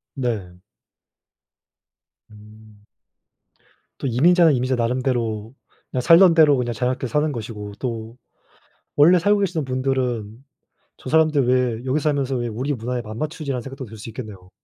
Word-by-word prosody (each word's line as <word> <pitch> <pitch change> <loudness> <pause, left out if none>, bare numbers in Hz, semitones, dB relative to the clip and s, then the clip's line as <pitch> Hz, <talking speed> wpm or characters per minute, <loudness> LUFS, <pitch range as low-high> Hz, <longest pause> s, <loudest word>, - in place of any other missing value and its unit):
네. 105 -9 -4 1.7
음. 105 0 -17 1.2
또 - - -3
이민자는 165 +7 +4
이민자 130 +1 0
나름대로 120 -2 -2 0.4
그냥 130 - -2
살던 170 +4 +7
대로 155 -3 +5
그냥 120 -2 -2
자유롭게 125 +3 -2
사는 150 +6 0
것이고 105 -4 -7
또 115 -2 -5 0.8
원래 170 +5 +6
살고 205 +4 +2
계시는 175 -6 -1
분들은 130 -3 -2 0.5
'저 - - -9
사람들 155 -4 +3
왜 125 -2 0
여기서 135 +3 0
살면서 140 -3 0
왜 120 0 -2
우리 125 +6 -3
문화에 125 0 -3
안 110 +1 -8
맞추지?'라는 150 -3 -4
생각도 135 +1 -8
들 110 -1 -12
수 110 +2 -9
있겠네요. 105 -6 -9
125 Hz, 305 characters per minute, -22 LUFS, 110-145 Hz, 1.7 s, 살던